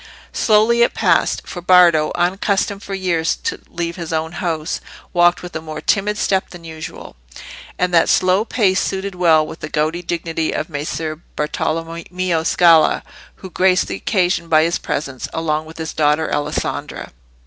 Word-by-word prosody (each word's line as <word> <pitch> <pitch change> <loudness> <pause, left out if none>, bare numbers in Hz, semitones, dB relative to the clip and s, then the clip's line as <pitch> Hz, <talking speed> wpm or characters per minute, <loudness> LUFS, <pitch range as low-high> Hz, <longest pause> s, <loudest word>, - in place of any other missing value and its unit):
Slowly 220 +2 +3
it 235 - +3
passed, - - +2
for 175 - -7
Bardo, 175 -4 +5
unaccustomed 195 +3 0
for 195 - -5
years 175 -4 0
to - - -3
leave 170 0 -4
his 170 -2 -6
own 160 0 -1
house, 165 -3 -3 0.3
walked 175 0 +3
with 180 - -9
a 160 - -3
more 155 -1 -7
timid 205 +6 0
step 190 -2 0
than 175 -2 -12
usual; 165 0 -9 0.6
and 180 0 0
that 165 - +4
slow 185 +3 +3
pace 195 -5 +1
suited 195 0 -3
well 165 -4 +3
with 160 - -9
the 155 - -6
gouty 155 +3 -1
dignity 165 -2 -2
of 155 - -3
Messer 155 +1 -4 0.2
Bartolommeo 165 +3 -2
Scala, 165 -1 +4 0.3
who 190 - -11
graced 185 +1 +3
the - - -4
occasion 180 -4 0
by 155 -1 +4
his 170 +1 0
presence, 140 -3 -4
along 155 -1 -1
with 160 - -12
his 160 -1 -5
daughter 150 +1 +1
Alessandra. 145 0 -3
170 Hz, 160 wpm, -19 LUFS, 160-185 Hz, 0.6 s, Bardo